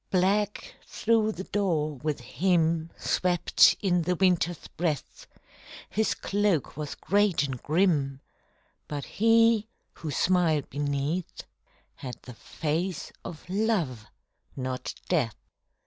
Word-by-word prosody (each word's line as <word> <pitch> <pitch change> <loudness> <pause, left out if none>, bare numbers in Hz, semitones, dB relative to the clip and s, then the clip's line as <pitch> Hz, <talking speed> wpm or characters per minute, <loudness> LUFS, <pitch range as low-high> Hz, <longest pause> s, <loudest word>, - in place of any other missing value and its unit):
_ - - -45
Black 200 +3 +1
through 220 -1 +1
the 190 - -6
door 170 -8 0
with 150 0 -3
him 165 +3 +1
Swept 180 -2 +4
in 180 -3 +2
the 180 +2 0
Winter's 175 -2 +1
breath; 155 -5 -3 0.6
His 220 +1 +1
cloak 200 -7 0
was 150 0 -5
great 200 -3 +2
and 135 -4 -4
grim 150 -5 +1 0.7
But 145 -2 -4
he, 225 0 +4 0.3
who 160 - -6
smiled 165 -1 +2
beneath, 145 +4 -2 0.5
Had 125 -2 -6
the 125 - -10
face 160 +8 -3
of 160 - -9
Love 180 - 0 0.5
not 130 -1 -4
Death. 130 - +1
170 Hz, 115 wpm, -27 LUFS, 145-195 Hz, 0.7 s, Swept